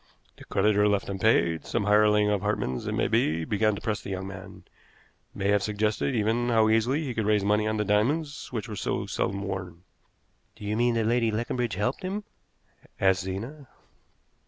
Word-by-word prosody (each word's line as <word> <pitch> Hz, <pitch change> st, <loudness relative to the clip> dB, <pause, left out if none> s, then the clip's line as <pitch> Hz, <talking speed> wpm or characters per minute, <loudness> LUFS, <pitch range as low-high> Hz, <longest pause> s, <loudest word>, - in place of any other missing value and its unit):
The -, -, -13 dB
creditor 105 Hz, -1 st, +2 dB
left 100 Hz, -1 st, 0 dB
unpaid, 95 Hz, -6 st, +2 dB
some -, -, -2 dB
hireling 105 Hz, 0 st, +4 dB
of 105 Hz, -2 st, +1 dB
Hartmann's 100 Hz, -11 st, -2 dB
it -, -, -1 dB
may -, -, +1 dB
be, 80 Hz, +1 st, +1 dB
began 105 Hz, +2 st, +1 dB
to 100 Hz, -, -8 dB
press 110 Hz, -2 st, -2 dB
the -, -, -8 dB
young 95 Hz, 0 st, -4 dB
man 95 Hz, -1 st, -10 dB, 0.7 s
may 100 Hz, -, -1 dB
have 100 Hz, 0 st, +3 dB
suggested, 105 Hz, +5 st, -1 dB
even, 115 Hz, +2 st, +1 dB
how 110 Hz, -2 st, +4 dB
easily 120 Hz, +8 st, +2 dB
he 130 Hz, -4 st, -3 dB
could 110 Hz, -2 st, -2 dB
raise 105 Hz, -2 st, +3 dB
money 105 Hz, +1 st, +2 dB
on 110 Hz, 0 st, -1 dB
the 105 Hz, -, 0 dB
diamonds, 140 Hz, +9 st, 0 dB
which 115 Hz, -2 st, -4 dB
were 110 Hz, -, -6 dB
so -, -, -2 dB
seldom 100 Hz, +1 st, -2 dB
worn." 90 Hz, -3 st, -6 dB, 0.7 s
"Do 105 Hz, -, -10 dB
you 105 Hz, +1 st, -1 dB
mean 120 Hz, +1 st, +2 dB
that 115 Hz, -1 st, +1 dB
Lady 115 Hz, 0 st, +2 dB
Leconbridge 115 Hz, 0 st, -2 dB
helped 105 Hz, +7 st, -1 dB
him?" 195 Hz, +3 st, -3 dB, 0.8 s
asked 95 Hz, -1 st, +3 dB
Zena. 120 Hz, +10 st, -6 dB
105 Hz, 185 wpm, -27 LUFS, 100-115 Hz, 0.8 s, hireling